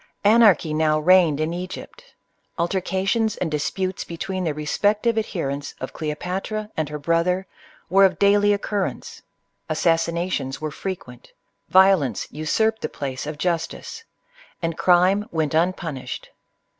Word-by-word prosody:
Anarchy 205 -7 +5
now 155 0 +2
reigned 170 -2 +4
in 155 +2 -1
Egypt. 180 - -7 0.5
Altercations 190 +5 0
and 165 - -2
disputes 185 +5 -2
between 185 +2 -4
the 155 - 0
respective 205 +9 +1
adherents 145 -10 -3
of 130 - -6
Cleopatra 185 +7 -4
and 155 -2 -2
her 150 - -4
brother 170 +5 +1 0.4
were 195 +3 +5
of 190 -1 +4
daily 205 +1 +4
occurrence. 200 - -3 0.5
Assassina 170 +2 +1
tions 135 -4 -3
were 155 -1 -4
frequent; 150 -9 -7 0.4
violence 185 - +4
usurped 220 +9 0
the - - -2
place 135 0 -5
of 150 0 -5
justice; 170 0 -3 0.6
and 165 -2 -2
crime 185 +5 +3
went 160 -2 -1
unpunished. 165 -4 -2
175 Hz, 125 wpm, -23 LUFS, 155-195 Hz, 0.6 s, Anarchy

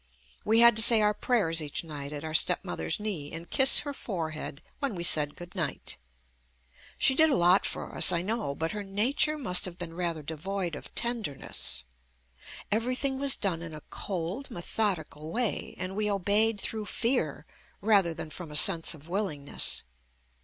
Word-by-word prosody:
We 225 +2 +4
had 235 -1 +7
to - - +6
say 225 0 +7
our 210 0 +3
prayers 200 -9 +1
each 150 +1 -5
night 145 -3 -7
at 145 0 -7
our 160 0 -6
stepmother's 175 0 +1
knee 185 -9 -4
and 165 +1 -8
kiss 265 0 +6
her 285 -1 -5
forehead 155 - -5 0.2
when 275 -7 -2
we 170 - -5
said 150 -4 +4
good 175 +1 -11
night. 170 -6 -3 1.0
She 265 - +3
did 315 +4 +4
a 280 - +2
lot 175 +3 +4
for - - -5
us, - - +8
I 170 -1 0
know, 210 -8 -3
but 165 +2 -3
her 210 - -5
nature 240 +10 +1
must 200 -11 +4
have 180 -2 -7
been 170 -2 -7
rather 170 -3 -3
devoid 175 +4 -4
of - - -10
tenderness. 215 - -2 0.9
Everything 255 +5 -1
was 280 -1 +5
done 180 -5 -2
in 165 -2 -8
a 150 - -10
cold 190 +8 -5
methodical 175 - -3
way, 240 0 -2
and 185 +1 -5
we 210 0 -1
obeyed 205 +2 +1
through 215 +1 -4
fear 205 - -1 0.3
rather 195 -5 +3
than 155 - -7
from 175 -1 -8
a 150 - -7
sense 165 +2 +5
of 155 +1 -16
willingness. 170 -7 -2
185 Hz, 175 wpm, -28 LUFS, 160-220 Hz, 1.0 s, us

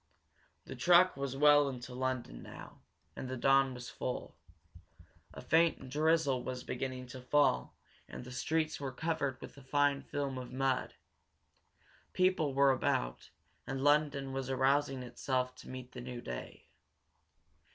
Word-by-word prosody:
The - - -7
truck 180 +1 +5
was 135 -1 -4
well 145 0 +6
into 125 -1 -7
London 130 - -3
now, - - -11 0.3
and 130 - -6
the 130 - -3
dawn 135 +1 +3
was 125 0 -8
full. 125 - -4 1.0
A - - -9
faint 160 -5 +2
drizzle 150 -3 +2
was 125 -1 -5
beginning 130 0 -4
to 130 +1 -8
fall 125 - +2 0.3
and - - -8
the 125 - -10
streets 155 +5 -1
were 140 -2 -4
covered 145 -2 -2
with - - -10
a - - -11
fine 140 +1 +2
film 140 -2 -3
of 125 -1 -8
mud. 130 0 -1 1.2
People 185 -7 +2
were 140 0 +5
about, - - -1 0.4
and 135 0 -3
London 145 -2 +2
was 135 -1 -3
arousing 135 0 +1
itself 125 +1 -2
to - - -12
meet 130 -1 -8
the 125 - -8
new 125 0 -6
day. 60 - -7
135 Hz, 145 wpm, -33 LUFS, 125-145 Hz, 1.2 s, well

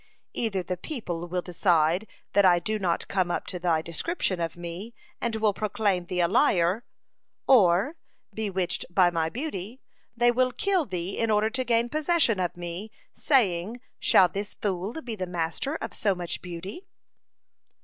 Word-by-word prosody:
Either 200 -5 -1
the 180 0 -3
people 175 - -5
will 180 +1 -2
decide 175 +1 +2 0.3
that 200 - +5
I 180 -2 +6
do 215 +4 -2
not 175 -4 -1
come 185 -2 0
up - - -2
to 180 - -5
thy 165 -3 +1
description 185 - -1
of 165 +1 -3
me, 175 +7 -7 0.3
and 235 -2 -1
will 215 -2 +2
proclaim 200 -3 0
thee 180 0 0
a 170 - +4
liar, 180 +4 +3 0.6
or, 215 - +4 0.4
bewitched 190 -4 -2
by 175 0 +4
my 165 -1 0
beauty, 235 - -5 0.4
they 240 0 +5
will 255 +1 +1
kill 380 -7 +1
thee 180 0 -3
in 230 - +1
order 215 +1 +2
to 255 +2 0
gain 235 -1 +2
possession 305 - +2
of 175 -1 -2
me, 175 +4 -5 0.2
saying, 220 - +1 0.2
Shall 185 - +6
this 200 +3 -5
fool 200 - -3
be 230 -3 -4
the 185 -3 -4
master 175 - -2
of - - -5
so 200 -3 +1
much 175 -1 -5
beauty?'" 185 - -8
190 Hz, 165 wpm, -27 LUFS, 175-230 Hz, 0.6 s, I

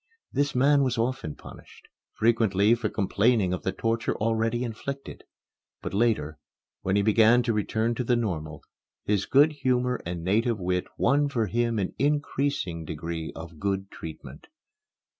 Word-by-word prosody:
This 145 -1 0
man 140 +3 +4
was 130 -3 0
often 115 - -2
punished, - - -14 0.3
frequently 110 -2 +3
for 115 -2 -1
complaining 100 -1 +2
of 90 - -3
the 95 - -1
torture 115 +2 -1
already 115 +2 0
inflicted. 135 +4 -6 0.5
But - - -6
later, 95 -9 0 0.4
when 95 +1 0
he 100 - +3
began 110 +3 +5
to 115 -1 0
return 110 +2 0
to 125 - -2
the 120 0 +2
normal, 80 -10 -3 0.4
his 100 -2 0
good 145 +3 +5
humor 125 -3 0
and 85 -1 -5
native 110 +4 +1
wit 90 0 -1
won 145 +2 +2
for 115 -5 0
him 115 +2 0
an 95 -3 -2
increasing 140 - 0
degree 80 +1 -5
of 80 -1 -9
good 95 0 -2
treatment. 80 -1 -10
110 Hz, 150 wpm, -26 LUFS, 95-125 Hz, 0.5 s, began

